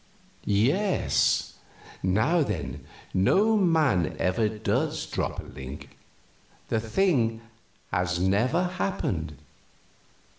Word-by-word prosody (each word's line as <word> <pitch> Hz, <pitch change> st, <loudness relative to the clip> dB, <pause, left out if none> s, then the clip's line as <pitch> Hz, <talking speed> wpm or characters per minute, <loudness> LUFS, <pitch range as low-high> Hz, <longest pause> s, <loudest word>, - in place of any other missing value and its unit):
"Yes. 140 Hz, -, +1 dB, 0.4 s
Now, 110 Hz, -, +2 dB
then, 70 Hz, -, -3 dB, 0.3 s
no 200 Hz, -, +3 dB
man 160 Hz, -, +2 dB
ever 105 Hz, +4 st, +1 dB
does 110 Hz, 0 st, -1 dB
drop -, -, -3 dB
a -, -, -5 dB
link 65 Hz, +2 st, -10 dB, 0.7 s
the 110 Hz, -, +1 dB
thing 115 Hz, -, +1 dB, 0.5 s
has 90 Hz, -1 st, 0 dB
never 105 Hz, -, +2 dB
happened! 95 Hz, -, -2 dB
110 Hz, 85 wpm, -26 LUFS, -, 0.7 s, no